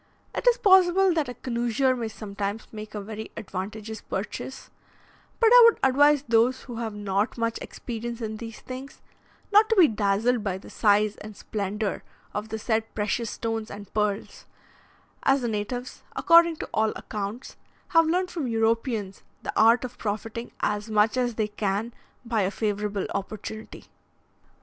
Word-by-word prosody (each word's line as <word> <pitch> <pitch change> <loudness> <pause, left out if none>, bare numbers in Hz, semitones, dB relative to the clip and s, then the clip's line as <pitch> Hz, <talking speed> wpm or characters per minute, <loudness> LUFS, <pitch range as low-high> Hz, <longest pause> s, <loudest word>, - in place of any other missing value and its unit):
It - - -3
is - - +6
possible 380 -4 +5
that 310 -6 0
a 245 - -6
connoisseur 240 +1 0
may 235 -2 -3
sometimes 205 -1 -5
make 215 0 -8
a 210 - -3
very 220 +2 -7
advantageous 215 +2 -6
purchase; 215 +6 -6 0.7
but 455 -1 +5
I - - +10
would 465 - +5
advise 285 +2 +5
those 240 +1 +2
who 240 -3 -8
have 225 -2 -4
not 205 +2 -1
much 230 0 -1
experience 235 0 -6
in 220 -2 -4
these 225 0 -8
things, 260 +2 -8 0.5
not 425 +2 +6
to 450 - +3
be 365 -6 +7
dazzled 215 +2 +1
by 190 -3 -1
the 190 - -13
size 210 -1 +3
and 215 -1 -10
splendour 205 0 -3 0.3
of 210 +1 -4
the 220 - -3
said 220 0 -1
precious 215 +2 -1
stones 225 -1 -3
and 205 -1 -10
pearls, 210 -1 -2 0.7
as 270 0 +3
the 240 - -1
natives, 235 +4 -4
according 335 -2 +6
to - - -7
all 220 0 +2
accounts, 210 +4 -6 0.3
have 330 -1 +5
learnt 360 +2 +1
from 315 -7 -3
Europeans 225 -3 0 0.2
the - - -3
art 230 +3 +5
of 250 0 -9
profiting 225 +2 -4
as 210 +1 -1
much 215 +1 +3
as 245 -2 0
they 215 -1 0
can 210 +2 -2 0.3
by 230 -2 0
a 190 - +1
favourable 205 -1 -2
opportunity. 215 +2 -6
225 Hz, 160 wpm, -26 LUFS, 210-255 Hz, 0.7 s, I